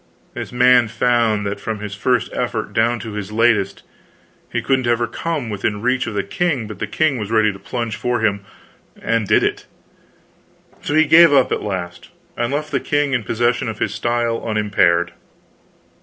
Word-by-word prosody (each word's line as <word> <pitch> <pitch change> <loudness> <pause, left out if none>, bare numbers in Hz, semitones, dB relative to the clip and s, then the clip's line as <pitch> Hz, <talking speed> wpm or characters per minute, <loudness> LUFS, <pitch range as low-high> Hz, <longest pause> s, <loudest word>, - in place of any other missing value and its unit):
This - - -6
man 125 -1 +5
found 115 -2 +1
that 100 +1 -3
from 110 -1 -4
his 105 -1 -6
first 120 +3 0
effort - - -3
down 115 +2 +2
to 110 - -7
his 105 -1 -5
latest, 110 -3 +1 0.7
he - - -1
couldn't 130 -2 0
ever 120 0 +2
come 150 +3 -4
within 105 0 -2
reach 125 +1 +1
of 110 - -5
the 100 - 0
king, 135 - -1
but 105 -2 -9
the - - -3
king 155 -5 0
was 105 -2 -4
ready 110 -2 +2
to 95 - -12
plunge 115 +2 -4
for 125 0 -1
him, 100 -2 0 0.6
and 115 -2 -1
did - - +3
it. - - -2 1.1
So 145 - -2
he 160 0 +5
gave 165 +1 +7
up 135 -3 +4
at - - -1
last, 90 -4 -5 0.3
and 120 +1 -2
left 150 +2 -3
the 140 - +1
king 145 0 0
in 125 -4 0
possession 120 +2 0
of 110 - -6
his - - -2
style 120 +1 -1
unimpaired. 105 -6 +1
115 Hz, 185 wpm, -19 LUFS, 105-125 Hz, 1.1 s, gave